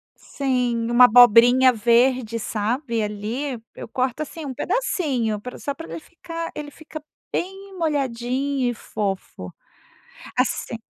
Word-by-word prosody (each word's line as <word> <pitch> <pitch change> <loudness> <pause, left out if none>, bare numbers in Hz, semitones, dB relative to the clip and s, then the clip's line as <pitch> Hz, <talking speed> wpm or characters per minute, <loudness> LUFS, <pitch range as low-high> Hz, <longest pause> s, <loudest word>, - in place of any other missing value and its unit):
sim, 245 -4 -1
uma 250 +1 +8
abobrinha 245 +2 +7
verde, 235 0 +2
sabe, 230 +3 -2
ali. 215 +7 -3 0.2
Eu - - -8
corto 255 +4 -2
assim 310 +1 -8
um 265 - -4
pedacinho 270 - -1
pra 250 +4 -8
só 280 - -4
pra 325 +3 -10
ele - - -6
ficar 335 0 -7
ele 295 -1 -6
ficar 310 +1 -10 0.3
bem 385 +1 -5
molhadinho 270 -3 -1
e - - -2
fofo. 195 - -5 0.9
Assi - - -1
255 Hz, 125 wpm, -23 LUFS, 230-295 Hz, 0.9 s, uma